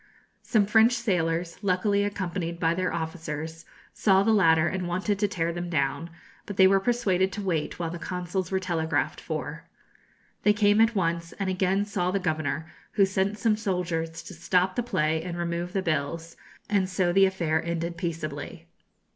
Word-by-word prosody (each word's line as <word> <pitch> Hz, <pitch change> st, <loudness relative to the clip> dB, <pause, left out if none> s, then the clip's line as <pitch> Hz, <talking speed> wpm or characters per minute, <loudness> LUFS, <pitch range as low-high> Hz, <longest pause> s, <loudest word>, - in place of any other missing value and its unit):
Some 215 Hz, -4 st, +2 dB
French 220 Hz, +3 st, +5 dB
sailors, 175 Hz, -7 st, -1 dB
luckily 200 Hz, +1 st, +1 dB
accompanied 185 Hz, -4 st, -3 dB
by 165 Hz, -1 st, +2 dB
their 185 Hz, +1 st, -1 dB
officers, 160 Hz, -1 st, -5 dB, 0.3 s
saw 195 Hz, -2 st, +3 dB
the 225 Hz, +1 st, +3 dB
latter 165 Hz, -5 st, +4 dB
and 185 Hz, -1 st, -2 dB
wanted 190 Hz, +3 st, -1 dB
to 205 Hz, -, +2 dB
tear 170 Hz, -4 st, -1 dB
them 175 Hz, +1 st, -4 dB
down; 155 Hz, +1 st, -1 dB, 0.4 s
but 205 Hz, -, -6 dB
they 190 Hz, -, +7 dB
were 195 Hz, +1 st, +5 dB
persuaded 190 Hz, -4 st, +1 dB
to 210 Hz, -, -4 dB
wait 165 Hz, -6 st, -1 dB
while 165 Hz, -2 st, -3 dB
the 175 Hz, -, -6 dB
consuls 180 Hz, 0 st, -3 dB
were 190 Hz, -, +1 dB
telegraphed 170 Hz, -4 st, -1 dB
for. -, -, -5 dB, 0.8 s
They 210 Hz, -, +4 dB
came 205 Hz, +1 st, +4 dB
at 225 Hz, 0 st, +3 dB
once, 170 Hz, -3 st, -1 dB
and 195 Hz, -2 st, -2 dB
again 190 Hz, +2 st, +1 dB
saw 180 Hz, -3 st, -1 dB
the 190 Hz, -, +1 dB
governor, 155 Hz, -4 st, -1 dB, 0.3 s
who 200 Hz, -2 st, +5 dB
sent 190 Hz, +2 st, -1 dB
some 215 Hz, +1 st, +2 dB
soldiers 175 Hz, -6 st, -2 dB
to -, -, -10 dB
stop 180 Hz, +2 st, +1 dB
the 245 Hz, -, +1 dB
play 160 Hz, -9 st, 0 dB
and 175 Hz, 0 st, -5 dB
remove 170 Hz, +1 st, -2 dB
the 190 Hz, 0 st, -1 dB
bills; 165 Hz, +1 st, -2 dB, 0.3 s
and 195 Hz, -3 st, +1 dB
so 185 Hz, -2 st, +1 dB
the 195 Hz, +1 st, +6 dB
affair 170 Hz, -4 st, 0 dB
ended 170 Hz, 0 st, -3 dB
peaceably. 165 Hz, -1 st, -5 dB
180 Hz, 175 wpm, -27 LUFS, 165-195 Hz, 0.8 s, they